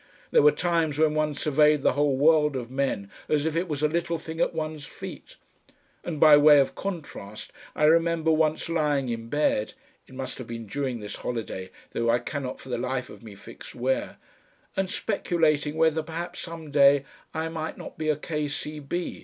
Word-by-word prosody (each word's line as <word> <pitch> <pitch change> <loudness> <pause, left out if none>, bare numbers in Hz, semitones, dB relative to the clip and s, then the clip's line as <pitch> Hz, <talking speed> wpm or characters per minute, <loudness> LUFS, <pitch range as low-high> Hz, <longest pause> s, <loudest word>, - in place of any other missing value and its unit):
There - - +6
were 150 +1 +7
times 160 -2 0
when 155 -1 +3
one 155 -1 0
surveyed 150 0 +3
the - - +4
whole 145 -1 +2
world 150 +1 +4
of 125 -2 -5
men 130 -7 -2 0.2
as 150 -1 +2
if 160 -1 -1
it 175 +3 0
was 150 -2 -3
a - - +5
little 170 +1 -1
thing 160 +1 -6
at - - +2
one's 155 -2 -4
feet, - - -10 0.7
and 160 -4 -4
by 150 -1 +8
way 145 0 +7
of 135 - +2
contrast 150 - -6 0.2
I - - -1
remember 165 +1 +4
once 155 0 +1
lying 150 -5 0
in 115 -1 -4
bed 115 -7 0 0.3
it 130 - -14
must 130 0 -6
have 125 - -7
been 115 -1 -6
during 130 0 -3
this 105 - -6
holiday, 110 -6 -4 0.2
though 115 0 0
I 120 - +4
cannot 135 0 -5
for 130 - -12
the 120 -2 -2
life 130 0 -3
of - - -13
me 110 -3 -11
fix 100 - -12
where 130 +2 -1 0.6
and 190 -1 0
speculating 160 -8 0
whether 160 0 +3
perhaps 165 +2 -6
some 165 -3 -7
day 140 -1 +5 0.3
I 160 +1 -3
might 160 -1 -5
not - - -10
be 155 -1 -1
a 155 - +3
K. 150 0 -3
C. 150 +1 -5
150 Hz, 195 wpm, -26 LUFS, 130-160 Hz, 0.7 s, by